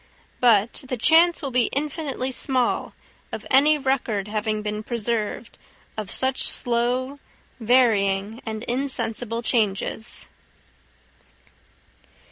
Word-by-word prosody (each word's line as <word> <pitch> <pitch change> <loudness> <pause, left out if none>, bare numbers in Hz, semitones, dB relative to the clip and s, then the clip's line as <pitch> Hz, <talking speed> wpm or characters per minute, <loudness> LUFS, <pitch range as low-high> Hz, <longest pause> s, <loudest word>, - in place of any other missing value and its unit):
But 230 +2 +3
the 255 - -3
chance 330 +7 +4
will 275 - -3
be 245 -1 +2
infinitely 280 -2 -3
small 255 -1 0 0.4
of - - -6
any 295 +3 +5
record 245 -7 -1
having 215 0 -2
been 210 0 -3
preserved 230 0 -3 0.4
of 215 -3 -6
such 260 0 +1
slow, 250 +3 0 0.4
varying, 220 -3 +2
and 220 -1 -5
insensible 240 -3 -1
changes. 220 -1 -1
240 Hz, 95 wpm, -23 LUFS, 215-265 Hz, 0.4 s, any